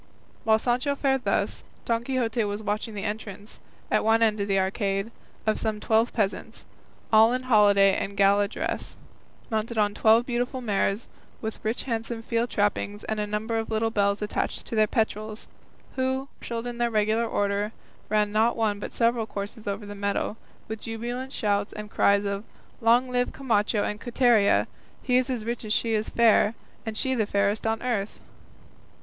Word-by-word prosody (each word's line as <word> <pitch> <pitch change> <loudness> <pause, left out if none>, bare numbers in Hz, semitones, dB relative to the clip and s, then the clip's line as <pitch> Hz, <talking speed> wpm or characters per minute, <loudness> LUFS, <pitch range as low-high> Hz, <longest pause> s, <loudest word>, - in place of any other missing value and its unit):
While 220 0 +5
Sancho 250 +5 0
fared 270 -2 0
thus, - - 0 0.2
Don 230 0 0
Quixote 240 -3 0
was 205 +1 -4
watching 210 +1 -2
the 200 - -4
entrance, 210 -1 -6 0.3
at - - +3
one 225 +1 +4
end 215 -1 +2
of 200 - -1
the 195 -1 +2
arcade, 195 +2 0 0.3
of 215 -1 +1
some 215 -1 -2
twelve 225 +2 +2
peasants, 205 -4 -2 0.5
all 220 +1 +7
in 255 0 -2
holiday 205 -5 +5
and 200 +1 -3
gala 200 +1 +4
dress, - - -4 0.6
mounted 220 +1 -2
on 205 -1 +2
twelve 225 +3 +4
beautiful 245 +1 -2
mares 210 -1 0 0.3
with 220 -1 -5
rich 220 +2 -1
handsome 230 -2 -3
field 230 +1 0
trappings 205 0 -1
and 220 0 -3
a 210 - -1
number 220 +2 -1
of 225 - -4
little 225 0 0
bells 200 -1 +1
attached 210 - -2
to - - -5
their 215 -1 +4
petrals, 215 0 -2 0.5
who, 260 +1 -1
marshalled 230 0 -5
in 240 -1 -5
regular 225 -1 +1
order, 205 0 0 0.4
ran 210 -1 +2
not 220 +3 +2
one 210 -3 0
but - - -6
several 230 -1 +1
courses 205 +2 -6
over 200 +1 -3
the 205 - -7
meadow, 200 +1 -2 0.3
with 220 0 -6
jubilant 240 +4 -4
shouts 205 -4 0
and 210 0 -8
cries 200 0 +3
of 200 0 -2 0.4
"Long 235 +3 +4
live 250 0 0
Camacho 215 -5 +1
and 210 0 -3
Quiteria! 240 -4 +3 0.4
he 250 -1 +3
as 255 -4 -2
rich 235 +1 -3
as 215 -1 -1
she 230 0 +1
is 215 0 0
fair; 225 -1 +4 0.3
and 220 -1 -3
she 260 +3 +1
the 220 -5 0
fairest 205 +2 +1
on 225 +1 -1
earth!" 220 -5 -2
220 Hz, 175 wpm, -26 LUFS, 205-235 Hz, 0.6 s, all